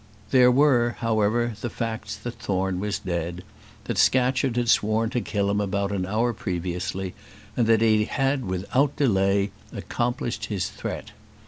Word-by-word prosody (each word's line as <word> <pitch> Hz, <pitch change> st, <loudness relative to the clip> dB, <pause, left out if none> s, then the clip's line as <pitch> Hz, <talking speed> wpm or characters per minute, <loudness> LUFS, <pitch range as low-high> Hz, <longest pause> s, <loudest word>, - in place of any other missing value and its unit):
There 125 Hz, -2 st, +6 dB
were, 125 Hz, -3 st, +3 dB
however, 115 Hz, +1 st, +1 dB
the 120 Hz, -, -2 dB
facts 115 Hz, 0 st, -4 dB
that 120 Hz, -1 st, -7 dB
Thorne 95 Hz, -1 st, -1 dB
was 105 Hz, +1 st, -1 dB
dead; 85 Hz, -1 st, -4 dB, 0.4 s
that -, -, -2 dB
Scatcherd 130 Hz, 0 st, +3 dB
had 120 Hz, -1 st, +1 dB
sworn 110 Hz, +1 st, +2 dB
to 125 Hz, -, 0 dB
kill 100 Hz, -3 st, -1 dB
him 105 Hz, 0 st, +1 dB
about 100 Hz, 0 st, -1 dB
an 95 Hz, -2 st, -2 dB
hour 115 Hz, +4 st, +1 dB
previously; 90 Hz, 0 st, -3 dB, 0.4 s
and 115 Hz, -, +2 dB
that 115 Hz, -1 st, +4 dB
he 110 Hz, -1 st, +4 dB
had 135 Hz, +2 st, 0 dB
without 100 Hz, +10 st, 0 dB
delay 100 Hz, -5 st, +2 dB, 0.2 s
accomplished 120 Hz, 0 st, -2 dB
his 95 Hz, -4 st, -2 dB
threat. -, -, -6 dB
110 Hz, 150 wpm, -25 LUFS, 95-120 Hz, 0.4 s, There